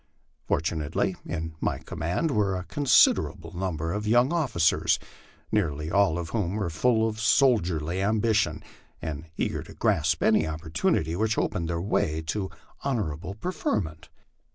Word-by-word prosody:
Fortunately, 80 Hz, +4 st, 0 dB
in 80 Hz, -2 st, -4 dB
my -, -, 0 dB
command 85 Hz, -, -2 dB
were 105 Hz, -5 st, +1 dB
a 90 Hz, -, -3 dB
considerable 130 Hz, -3 st, +3 dB
number 85 Hz, -3 st, -2 dB
of 105 Hz, +1 st, -3 dB
young 120 Hz, +7 st, +4 dB
officers, 125 Hz, -, +2 dB, 0.5 s
nearly 80 Hz, -7 st, 0 dB
all 100 Hz, -4 st, +3 dB
of 85 Hz, -2 st, -4 dB
whom 100 Hz, -3 st, -1 dB
were 100 Hz, -6 st, -2 dB
full 110 Hz, +6 st, +2 dB
of 110 Hz, -1 st, -4 dB
soldierly 90 Hz, -, +2 dB
ambition, 110 Hz, +2 st, +1 dB, 0.4 s
and 80 Hz, -1 st, -5 dB
eager -, -, -1 dB
to -, -, -12 dB
grasp 80 Hz, 0 st, +1 dB
any 105 Hz, -8 st, +4 dB
opportunity 80 Hz, 0 st, -1 dB
which 110 Hz, +3 st, 0 dB
opened 85 Hz, -2 st, -1 dB
the 85 Hz, -1 st, -1 dB
way 85 Hz, -4 st, 0 dB
to 95 Hz, +4 st, -2 dB, 0.3 s
honorable 95 Hz, -, -2 dB
preferment. 105 Hz, -, -3 dB
95 Hz, 135 wpm, -27 LUFS, 80-110 Hz, 0.5 s, young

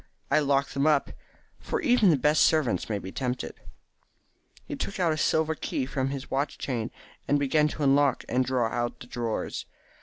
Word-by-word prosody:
I -, -, +5 dB
lock 140 Hz, -1 st, +1 dB
them 140 Hz, +2 st, 0 dB
up, 150 Hz, -3 st, +2 dB, 0.5 s
for -, -, -3 dB
even 245 Hz, -8 st, +4 dB
the 155 Hz, -, +4 dB
best 150 Hz, +3 st, +3 dB
servants 155 Hz, -9 st, +2 dB
may 105 Hz, -, 0 dB
be 95 Hz, -1 st, -7 dB
tempted." 125 Hz, +1 st, -3 dB, 1.1 s
He -, -, -5 dB
took 200 Hz, -, -4 dB
a 170 Hz, -4 st, +2 dB
silver 160 Hz, +1 st, +1 dB
key 135 Hz, -, -3 dB
from 130 Hz, 0 st, -2 dB
his 140 Hz, 0 st, -6 dB
watch 140 Hz, +2 st, -1 dB
chain, 120 Hz, -4 st, -3 dB, 0.4 s
and 145 Hz, -, +3 dB
began 145 Hz, +2 st, +2 dB
to 150 Hz, 0 st, -4 dB
unlock 140 Hz, 0 st, +3 dB
and 130 Hz, +1 st, +1 dB
draw 125 Hz, -2 st, +1 dB
out 120 Hz, +1 st, -3 dB
the -, -, -10 dB
drawers. 120 Hz, -2 st, -4 dB
140 Hz, 180 wpm, -27 LUFS, 125-155 Hz, 1.1 s, I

